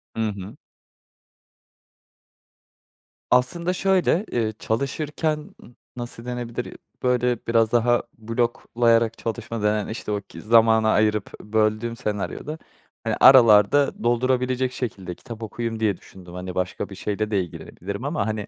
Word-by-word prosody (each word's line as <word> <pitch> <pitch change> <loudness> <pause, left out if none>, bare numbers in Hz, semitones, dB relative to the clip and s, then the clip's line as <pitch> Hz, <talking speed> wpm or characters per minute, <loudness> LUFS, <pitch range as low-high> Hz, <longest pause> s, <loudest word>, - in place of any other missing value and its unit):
I - - -5
hı. 100 +5 -8 2.8
Aslında, 170 +9 +2
şöyle, 190 0 +2
eee, 110 -2 0
çalışırken 150 +5 -2 0.4
nasıl 120 -1 -7
denebilir? 120 -1 -5 0.3
Böyle, 125 -1 +2
biraz 115 -1 +3
daha 120 0 +3
bloklayarak 115 0 +1
çalışma 115 0 -4
denen, 105 -1 +1
işte, 110 -1 -5
o 105 -1 -1
ki - - -12
zamana 110 0 +4
ayırıp, 105 -1 +1
böldüğüm 110 +2 0
senaryoda. 120 +7 -4 0.5
Hani, - - 0
aralarda 125 +1 +6
doldurabilecek 125 +1 +1
şekilde 95 -9 -5
kitap 115 -3 -9
okuyayım 115 +1 -4
diye 105 -4 +1
düşündüm. 90 -2 -14
Hani, 90 0 -6
başka 90 +1 -2
bir 95 - -9
şeyle 105 +2 -3
de 100 -2 +2
ilgilenebilirim 100 +5 -7
ama, 125 -9 -1
hani, 110 -1 -3
115 Hz, 120 wpm, -24 LUFS, 105-125 Hz, 2.8 s, aralarda